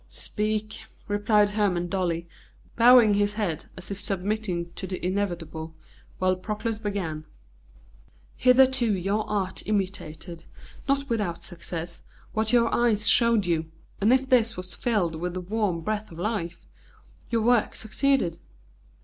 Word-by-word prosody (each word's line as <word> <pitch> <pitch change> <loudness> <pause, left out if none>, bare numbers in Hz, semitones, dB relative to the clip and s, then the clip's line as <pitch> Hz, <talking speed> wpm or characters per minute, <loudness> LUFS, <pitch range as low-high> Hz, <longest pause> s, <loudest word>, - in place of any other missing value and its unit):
"Speak," 215 0 -2 0.3
replied 205 0 +2
Hermon 200 -5 +1
dully, 170 -2 -2 0.5
bowing 235 -2 +7
his 205 +1 +1
head 180 -8 -2
as 185 +2 -7
if 200 - -5
submitting 190 -3 -2
to 190 - -6
the 185 0 -4
inevitable, 170 -4 -3 0.4
while 185 0 +2
Proclus 215 +3 -4
began: 190 -8 -3 1.1
"Hitherto 255 -3 +4
your 200 +4 -1
art 195 -3 -2
imitated, 185 -5 -3 0.4
not 275 0 +1
without 205 -8 -2
success, 170 0 -6 0.3
what 220 0 0
your 235 -2 +3
eyes 220 -3 +2
showed 230 -4 +5
you, 165 -2 -1 0.3
and 210 +4 +3
if 265 +1 +3
this 230 -3 +3
was 185 0 -4
filled 205 -9 0
with 180 +2 -4
the - - -2
warm 195 -3 -1
breath 215 +4 -3
of 165 - -11
life, 175 -3 -3 0.6
your 230 -2 +1
work 240 -1 +2
succeeded. 220 - 0
205 Hz, 130 wpm, -26 LUFS, 175-220 Hz, 1.1 s, bowing